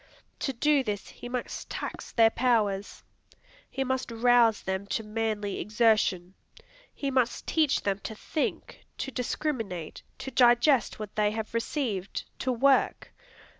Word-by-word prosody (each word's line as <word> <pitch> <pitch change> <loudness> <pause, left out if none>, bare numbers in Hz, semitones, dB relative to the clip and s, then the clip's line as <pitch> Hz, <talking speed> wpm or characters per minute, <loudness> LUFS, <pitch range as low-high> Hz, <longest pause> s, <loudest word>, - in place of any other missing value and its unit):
To 270 - -1
do 280 +2 +2
this, 210 -4 -4
he 245 - -9
must 250 -1 -5
tax - - -6
their 225 -1 +5
powers. 215 -6 0 0.7
He 270 - -2
must 260 0 -2
rouse 235 -1 +4
them 190 +1 -3
to 225 - -2
manly 210 -2 -2
exertion. 210 -5 +2 0.6
He 275 -1 -3
must 255 -2 0
teach 310 -4 +2
them 200 -1 0
to 220 - -6
think, 300 +7 -3
to 270 - -4
discriminate, 230 - -3 0.2
to 265 - -6
digest 240 +1 +4
what 215 -2 -7
they 210 -1 +3
have 220 +1 -5
received, 230 - -2 0.2
to 260 - 0
work. 265 +3 +2
230 Hz, 135 wpm, -28 LUFS, 210-260 Hz, 0.7 s, their